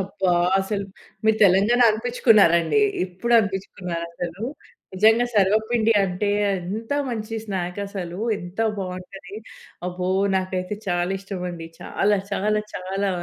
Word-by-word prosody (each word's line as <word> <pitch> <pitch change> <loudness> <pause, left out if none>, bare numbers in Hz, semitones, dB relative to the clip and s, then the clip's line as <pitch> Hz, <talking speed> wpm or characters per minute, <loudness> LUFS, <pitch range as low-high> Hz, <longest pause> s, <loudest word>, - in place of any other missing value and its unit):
అబ్బా! 190 -1 -1 0.3
అసలు, 200 +1 -3 0.4
మీరు 220 0 +4
తెలంగాణా 205 +6 +4
అనిపించుకున్నారండి. 220 - +3 0.2
ఇప్పుడు 190 +6 -3
అనిపించుకున్నారు 190 -4 -3
అసలు. 175 +3 -6 0.5
నిజంగా 220 +5 +4
సర్వపిండి 220 +3 +3
అంటే 195 +2 -1 0.3
ఎంత 210 +8 -5 0.2
మంచి 225 -2 -4
స్నాక్ 185 -3 -4
అసలు. 180 -3 -6 0.2
ఎంత 175 +3 -10 0.2
బాగుంటది. 190 +2 -7 0.5
అబ్బో! 180 0 -3 0.3
నాకైతే 185 +1 -2
చాలా 175 +1 0
ఇష్టం 195 -1 -6
అండి. 165 -2 -8
చాలా 205 0 +1
చాలా 210 +2 +1
చాలా 195 +2 -2
195 Hz, 115 wpm, -23 LUFS, 180-215 Hz, 0.5 s, మీరు